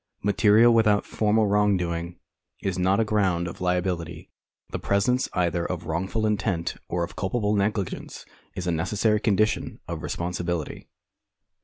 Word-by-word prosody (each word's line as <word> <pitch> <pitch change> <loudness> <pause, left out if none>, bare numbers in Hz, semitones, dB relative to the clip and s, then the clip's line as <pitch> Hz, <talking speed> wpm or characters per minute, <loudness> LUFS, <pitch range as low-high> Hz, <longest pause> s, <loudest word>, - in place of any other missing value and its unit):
Material 105 +3 +5
without 105 -3 +3
formal 110 0 +2
wrongdoing 90 -4 0 0.5
is 95 -1 -1
not 95 +3 +2
a 115 - +3
ground 95 -5 +1
of 85 - -8
liability. 90 -2 -2 0.4
The - - -3
presence 125 +6 +1
either 85 -2 0
of 85 -1 -4
wrongful 95 +7 -1
intent 100 -5 0 0.2
or 85 0 -1
of - - -6
culpable 105 +2 -1
negligence 100 -1 -2 0.3
is 90 -2 -4
a 90 - +1
necessary 105 +6 +1
condition 110 0 0
of - - -5
responsibility. 85 -2 -3
95 Hz, 135 wpm, -25 LUFS, 85-105 Hz, 0.5 s, Material